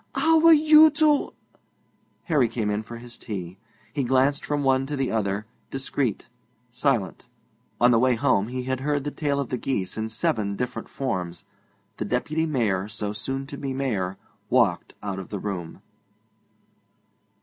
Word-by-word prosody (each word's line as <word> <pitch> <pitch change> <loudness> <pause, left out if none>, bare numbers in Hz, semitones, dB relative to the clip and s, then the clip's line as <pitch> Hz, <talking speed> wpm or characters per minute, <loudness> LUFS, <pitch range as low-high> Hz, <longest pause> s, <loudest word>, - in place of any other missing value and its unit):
'How 325 0 +4
were 330 +1 +7
you 310 0 +8
to 300 -2 +3 0.5
?' - - -41
Harry 145 -8 +2
came 110 -2 -2
in 105 +1 -1
for 115 +2 -9
his 120 0 -10
tea. 95 -3 -6 0.3
He 140 - 0
glanced 130 +3 +2
from 145 -1 -1
one 135 0 +2
to 145 - -3
the 135 -2 -1
other, 105 -1 -1 0.2
discreet, 135 -4 -2 0.5
silent. 125 -5 -1 0.5
On 120 +2 +5
the 115 - +4
way 125 0 +3
home 115 -5 +2
he 125 +1 -4
had 130 0 -2
heard 145 +1 -1
the 145 - -3
tale 145 -2 -1
of 140 - -3
the 125 - -2
geese 105 -6 -2
in 110 0 -2
seven 110 -2 -1
different 125 +3 -4
forms. 90 -8 -4 0.5
The - - -3
Deputy 155 +9 -1
Mayor, 105 -10 0
so 105 -1 -4
soon 135 +5 -4
to 140 0 -8
be 135 -2 -3
Mayor, 100 -9 -2 0.3
walked - - +2
out 100 -2 -3
of 95 - -8
the 105 - -4
room. 90 -5 -5
125 Hz, 170 wpm, -25 LUFS, 105-140 Hz, 0.5 s, you